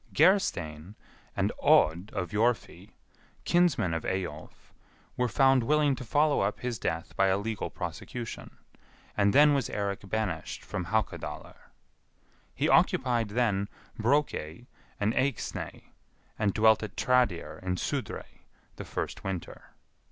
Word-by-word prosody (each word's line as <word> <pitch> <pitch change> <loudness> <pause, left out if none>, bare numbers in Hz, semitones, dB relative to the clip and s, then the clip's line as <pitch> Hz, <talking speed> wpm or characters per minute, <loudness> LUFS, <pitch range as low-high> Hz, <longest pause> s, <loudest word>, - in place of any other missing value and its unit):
Gerstein, 90 - +2 0.4
and - - +1
Odd 85 +6 +4
of 90 -3 -3
Jorfi, 115 +2 -1 0.5
kinsman 170 - +2
of 80 - -2
Eyjolf, 90 -5 -5 0.4
were 125 - +1
found 135 +1 +4
willing 150 +3 +3
to 130 - -7
follow 145 +5 +2
up 100 +1 -1
his 120 -3 -3
death 80 +1 -3
by 95 - +3
a 95 0 +3
legal 110 +1 -3
prosecution; 120 -3 -7 0.6
and 100 0 +3
then 145 +3 +6
was 135 -4 0
Eirik 100 -1 -3
banished 100 -6 -3
from 90 - -4
Haukadalr. 110 +4 -3 1.0
He - - +1
occupied 120 -4 +3
then 105 -3 0 0.3
Brokey 120 - 0 0.3
and 105 +2 +1
Eyxney, 135 -2 -3 0.5
and 105 -2 +2
dwelt 110 +2 +4
at 105 -2 -7
Tradir, 90 -11 +1
in 90 0 -1
Sudrey, - - -5 0.3
the - - -6
first - - -4
winter. 95 -3 -6
110 Hz, 125 wpm, -29 LUFS, 95-125 Hz, 1.0 s, then